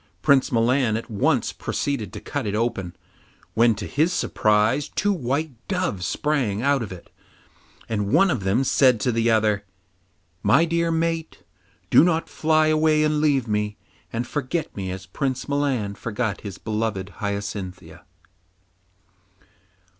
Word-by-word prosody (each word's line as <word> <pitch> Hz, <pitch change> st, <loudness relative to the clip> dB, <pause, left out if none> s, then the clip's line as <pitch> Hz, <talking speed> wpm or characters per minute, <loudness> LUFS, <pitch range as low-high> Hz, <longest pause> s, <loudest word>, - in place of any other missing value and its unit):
Prince 140 Hz, -3 st, +4 dB
Milan 120 Hz, -1 st, +2 dB
at 115 Hz, +1 st, -8 dB
once 100 Hz, -, +1 dB
proceeded 115 Hz, -9 st, -3 dB
to -, -, -7 dB
cut 145 Hz, -6 st, -4 dB
it 100 Hz, -, -1 dB
open, 105 Hz, -6 st, -2 dB, 0.6 s
when 115 Hz, 0 st, +4 dB
to 100 Hz, 0 st, -6 dB
his 155 Hz, +5 st, +1 dB
surprise 110 Hz, -3 st, +1 dB
two 205 Hz, +1 st, 0 dB
white 145 Hz, 0 st, -1 dB, 0.2 s
doves 180 Hz, -, -1 dB
sprang 135 Hz, -10 st, 0 dB
out 140 Hz, -1 st, +2 dB
of 110 Hz, -, -5 dB
it, 90 Hz, -2 st, -11 dB, 0.8 s
and 105 Hz, -2 st, -2 dB
one 195 Hz, -2 st, +5 dB
of 115 Hz, -10 st, -2 dB
them 100 Hz, +8 st, +2 dB
said 130 Hz, -3 st, +4 dB
to 125 Hz, -, +1 dB
the 115 Hz, 0 st, +1 dB
other: 105 Hz, -2 st, +2 dB, 0.8 s
'My 155 Hz, +6 st, +4 dB
dear 170 Hz, 0 st, 0 dB
mate, 165 Hz, 0 st, -2 dB, 0.5 s
do -, -, +7 dB
not 165 Hz, -2 st, +1 dB
fly 155 Hz, 0 st, +2 dB
away 155 Hz, 0 st, +3 dB
and 150 Hz, -1 st, +1 dB
leave 140 Hz, -5 st, +2 dB
me, 105 Hz, -1 st, -1 dB, 0.3 s
and 115 Hz, +2 st, -2 dB
forget 145 Hz, +4 st, -3 dB
me 95 Hz, -2 st, -4 dB
as 95 Hz, 0 st, -6 dB
Prince 130 Hz, +7 st, -3 dB
Milan 140 Hz, -8 st, 0 dB
forgot 110 Hz, -1 st, -3 dB
his 100 Hz, -4 st, -7 dB
beloved 105 Hz, -3 st, -2 dB
Hyacinthia. 100 Hz, -2 st, -5 dB
120 Hz, 145 wpm, -23 LUFS, 105-150 Hz, 0.8 s, do